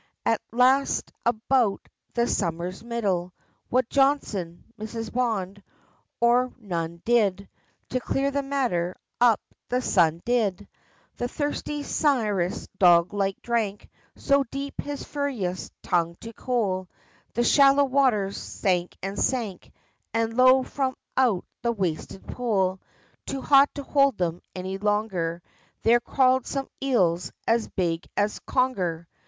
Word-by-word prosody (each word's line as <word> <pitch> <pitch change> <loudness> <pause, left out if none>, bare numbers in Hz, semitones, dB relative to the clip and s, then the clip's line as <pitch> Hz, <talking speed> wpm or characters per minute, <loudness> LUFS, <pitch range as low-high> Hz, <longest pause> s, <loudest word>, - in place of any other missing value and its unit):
At 225 - +2
last 255 +4 +3 0.2
about 235 -2 +1 0.3
the 235 0 +3
summer's 175 0 -2
middle, 195 -7 -2 0.3
What 255 -1 +2
Johnson, 230 -12 0 0.2
Mrs. 225 +1 -5
Bond, 205 -6 -1 0.6
or 245 +2 +3
none 170 -6 -4
did, 200 -5 +2 0.4
To 255 - 0
clear 275 +3 -1
the 280 0 0
matter 245 -11 -1 0.2
up 240 -3 +5 0.3
the 250 - +1
Sun 170 -8 +2
did! 205 -5 0 0.5
The 245 - -1
thirsty 290 +1 -3
Sirius 215 - 0
dog 175 -1 +5
like 195 -1 -1
drank 220 -4 -2 0.2
So 280 0 +2
deep, 275 +3 -5
his 290 -1 -5
furious 240 -12 -3
tongue 170 -1 0
to 230 0 -8
cool, 200 -8 -1 0.5
The 240 - +2
shallow 275 +3 +6
waters 250 -8 +2
sank 180 -2 -1
and 195 +1 -3
sank, 225 -8 -2 0.4
And 225 0 0
lo, 255 +1 +6
from 260 -1 -2 0.2
out 240 -9 +2 0.2
the 235 -1 0
wasted 190 -2 -3
pool, 190 -6 -1 0.5
Too 270 -1 -4
hot 275 0 +6
to 285 - -5
hold 275 -4 +3
them 175 -1 -1
any 190 +1 -4
longer, 195 -5 -1 0.4
There 235 +1 +5
crawled 260 0 +2
some 275 -1 -3
eels 185 -10 +1 0.2
as 230 0 +2
big 170 -3 -2
as 205 +1 0
conger! 185 -11 0
225 Hz, 125 wpm, -25 LUFS, 185-255 Hz, 0.6 s, shallow